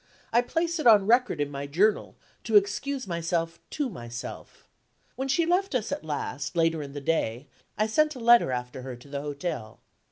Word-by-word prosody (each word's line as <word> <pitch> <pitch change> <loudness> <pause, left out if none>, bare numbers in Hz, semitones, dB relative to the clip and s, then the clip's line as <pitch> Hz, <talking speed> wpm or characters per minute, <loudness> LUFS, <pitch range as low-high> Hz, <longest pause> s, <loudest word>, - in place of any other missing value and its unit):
I 235 - +5
place 335 +6 -1
it 305 - +2
on 210 -4 +7
record 240 -3 +3
in 145 0 -1
my 140 0 -5
Journal, 195 +9 +1 0.3
to 225 - 0
excuse 210 +7 +2
myself 170 -1 -2
to 295 -2 -2
myself. 120 - -8 0.5
When 265 +2 -3
she 300 +5 +2
left 360 -1 +1
us 225 -4 -1
at - - -3
last, 145 0 -4
later 165 -1 +2
in 140 -1 -8
the 145 - -6
day, 135 -4 -1 0.3
I 215 - +2
sent 305 +7 +2
a - - -8
letter 235 - +5
after 125 +1 -4
her 130 -1 -6
to 120 +4 -16
the 140 0 -4
hotel. 145 -5 -5
175 Hz, 190 wpm, -27 LUFS, -, 0.5 s, on